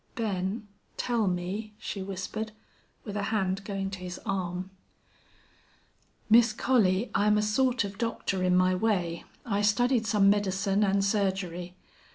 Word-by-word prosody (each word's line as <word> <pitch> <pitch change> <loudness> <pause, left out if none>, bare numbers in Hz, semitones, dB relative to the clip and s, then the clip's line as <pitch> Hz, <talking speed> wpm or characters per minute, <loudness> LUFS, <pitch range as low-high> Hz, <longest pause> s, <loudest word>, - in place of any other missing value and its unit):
"Ben, 210 -1 -2 0.3
tell 235 -4 0
me," 190 +4 -3
she 205 -2 -5
whispered, 195 +3 -5 0.5
with 205 - -6
a 205 - -1
hand 195 -3 0
going 195 -1 -3
to 190 - -6
his 180 -1 -6
arm. 185 -1 -3 1.6
"Miss 230 0 +6
Collie, 225 -4 +2
I'm 210 +1 +3
a 210 - +2
sort 250 +3 +2
of 200 -1 -7
doctor 230 -5 -1
in 180 0 +3
my 185 0 +4
way. 180 -4 0 0.2
I 205 -3 0
studied 230 +2 +2
some 205 -3 +4
medicine 200 0 +2
an' 195 0 +2
surgery. 190 -3 -1
200 Hz, 140 wpm, -28 LUFS, 185-215 Hz, 1.6 s, Miss